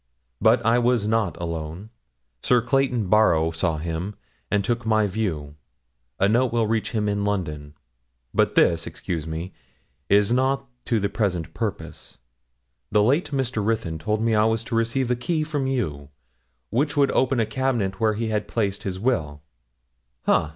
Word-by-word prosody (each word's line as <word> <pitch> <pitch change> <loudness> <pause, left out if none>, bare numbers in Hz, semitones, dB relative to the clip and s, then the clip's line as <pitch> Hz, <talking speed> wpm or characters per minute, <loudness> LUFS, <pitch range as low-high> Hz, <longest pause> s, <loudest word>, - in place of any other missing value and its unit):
But - - +4
I 115 +2 +4
was 120 -3 +2
not 105 -7 0
alone; 85 +4 -5 0.5
Sir 125 - +4
Clayton 125 -3 +1
Barrow 85 -6 +4
saw 80 0 0
him, 85 +5 -4 0.3
and 100 -2 +1
took 120 +1 -1
my 110 -1 +2
view; 90 -8 -3 0.7
a 100 - +4
note 120 +4 +2
will 115 -1 +2
reach 110 0 0
him 105 -3 -1
in 100 0 0
London. 75 -7 -3 0.6
But - - +2
this, 85 0 +3
excuse 80 -3 -4
me, 80 +4 -5 0.6
is 100 +1 +4
not 135 +2 +1 0.2
to 115 - +1
the 100 - 0
present 95 -6 -2
purpose. - - -5 0.7
The 105 0 +4
late 140 - +2
Mr. 130 -6 -1
Ruthyn 105 -7 -1
told 105 +5 -1
me 115 -1 +2
I 105 0 +4
was 110 0 +1
to 115 0 -4
receive 115 +2 +1
a - - +3
key 155 +6 -1
from 145 -3 -2
you, 75 - -2 0.6
which 145 +7 0
would 140 -1 +4
open 130 -1 +2
a 115 - +3
cabinet 115 -7 -1
where 110 -1 +2
he 110 +1 -2
had 105 -1 -1
placed 100 -3 -1
his 95 -2 -4
will 80 - -1 0.8
ha! 80 - +3
110 Hz, 165 wpm, -24 LUFS, 90-120 Hz, 0.8 s, But